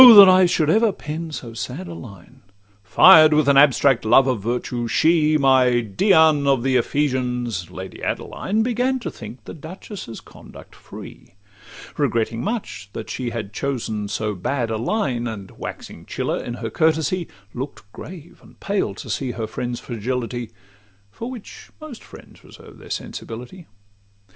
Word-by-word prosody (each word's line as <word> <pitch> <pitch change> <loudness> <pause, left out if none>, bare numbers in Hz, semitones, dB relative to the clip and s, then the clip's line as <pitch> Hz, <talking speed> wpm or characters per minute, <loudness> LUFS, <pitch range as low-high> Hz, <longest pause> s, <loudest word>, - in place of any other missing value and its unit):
that 200 -2 +11
I 185 0 +6
should 155 -3 +2
ever 220 0 +4
pen 160 -1 -6
so 120 -6 -7
sad 130 +10 -6
a 170 - -7
line! 120 - -12 0.4
Fired 155 - +7
with 150 -2 +3
an 140 - +5
abstract 135 -3 +5
love 120 +4 +5
of 125 -6 -1
virtue, 120 +1 -2
she, 155 +3 +3
My 130 -3 +4
Dian 155 - +3
of 135 -3 +2
the 130 -1 +1
Ephesians, 125 - -1
Lady 95 +1 -9
Adeline, 215 +3 -2
Began 250 +2 0
to - - -4
think 115 +3 -11
the - - -8
duchess' 165 - -9
conduct - - -15
free; - - -12 0.6
Regretting 115 +1 0
much 150 - -4
that 110 - -6
she 125 -2 -3
had 110 -3 -6
chosen 110 -5 -3
so 105 +1 -2
bad 115 +5 -2
a 110 - -1
line, 125 - -1
And 100 -4 -7
waxing - - -9
chiller - - -2
in 120 - -5
her 115 -2 -5
courtesy, 160 - +1 0.3
Look'd 135 +3 -6
grave 170 -1 -11
and - - -19
pale 195 - -1
to - - -9
see 130 -3 -2
her 110 0 -4
friend's 120 +2 -4
fragility, 120 0 -4 0.6
For 230 - -7
which 245 -5 -10
most 310 -7 -10
friends - - -15
reserve - - -15
their - - -13
sensibility. 125 +10 -7
130 Hz, 155 wpm, -21 LUFS, 115-160 Hz, 0.6 s, that